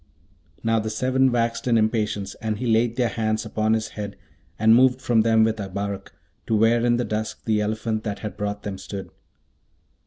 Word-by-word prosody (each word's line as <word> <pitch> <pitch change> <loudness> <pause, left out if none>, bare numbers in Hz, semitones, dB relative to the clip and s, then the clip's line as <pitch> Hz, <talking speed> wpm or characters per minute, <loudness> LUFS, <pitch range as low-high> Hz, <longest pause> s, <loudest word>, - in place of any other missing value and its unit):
Now, 115 0 +2
the 110 0 -3
seven 130 +4 +2
waxed 115 0 -1
in 115 -2 +4
impatience, 105 -3 0
and 110 -1 -2
he 125 - -4
laid 115 0 +2
their 125 -2 +2
hands 110 0 -1
upon 110 0 0
his 110 0 -2
head 100 -2 -6 0.4
and 110 +1 +5
moved 130 +1 +5
from 120 -3 +2
them 110 0 +4
with 110 0 +1
Abarak, 100 0 -4 0.4
to 110 - +2
where 115 +2 +3
in 120 0 +3
the 120 - -1
dusk 110 0 -4
the 110 -2 +2
elephant 110 +1 -2
that 105 -2 -3
had 105 - -6
brought 105 0 -4
them 100 -2 -5
stood. 100 0 -7
110 Hz, 190 wpm, -24 LUFS, 105-115 Hz, 0.4 s, and